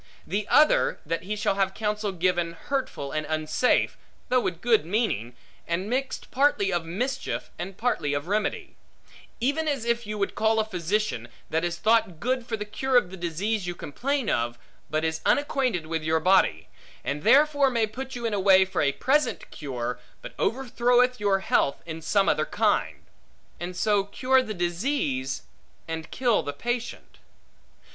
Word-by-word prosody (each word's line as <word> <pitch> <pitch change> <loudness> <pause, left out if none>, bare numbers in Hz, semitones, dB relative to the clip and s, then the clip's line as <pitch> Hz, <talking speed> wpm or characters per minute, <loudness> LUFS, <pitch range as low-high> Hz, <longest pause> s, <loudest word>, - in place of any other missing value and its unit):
The 200 +4 -2
other, 300 +1 +4
that 165 +2 -2
he 210 +2 -2
shall 205 - +1
have 190 0 +1
counsel 210 -1 -1
given, 175 -2 0
hurtful 170 - -3
and 155 - -1
unsafe 155 +9 +1 0.3
(though 255 - +4
with 175 -8 -2
good 225 -2 +3
meaning), 160 - -1 0.3
and 185 +6 -2
mixed 265 +1 -2
partly 250 -8 +2
of 175 -1 0
mischief 240 +11 -3
and 185 +2 -6
partly 160 -12 0
of 145 - -3
remedy; 210 +2 -1 0.6
even 285 +6 0
as 275 -6 -1
if 235 -1 0
you 210 0 -4
would 200 -1 -1
call 220 +1 +2
a 220 - +2
physician, 190 - -1 0.2
that 160 +1 +1
is 175 0 -1
thought 215 -6 +2
good 250 +3 -1
for 225 - -2
the 210 - -4
cure 255 +5 +1
of 180 -7 +2
the - - -6
disease 180 +4 -2
you 175 - -3
complain 265 - -2
of, 120 -8 0 0.3
but 155 +1 0
is 160 0 -1
unacquainted 260 - +1
with 160 0 -2
your 160 +1 +1
body; 180 - +3 0.4
and 145 +1 -2
therefore 285 - +5
may 230 -3 +1
put 260 +5 -7
you 240 -1 -4
in 205 -4 0
way 190 -1 +7
for 190 - -2
a 140 -2 +2
present 295 - 0
cure, 125 -4 -4 0.2
but - - -9
overthroweth 250 0 +2
your 200 -2 +2
health 140 -6 +1
in 165 -1 -6
some 195 +4 +2
other 155 - +2
kind; - - 0 0.6
and 175 +2 -5
so 205 +1 +2
cure 260 +6 +2
the 215 -4 -5
disease, 175 - -1 0.4
and 160 0 -5
kill 245 -4 +2
the 145 - -4
patient. 240 +9 -4
200 Hz, 170 wpm, -26 LUFS, 165-245 Hz, 0.6 s, way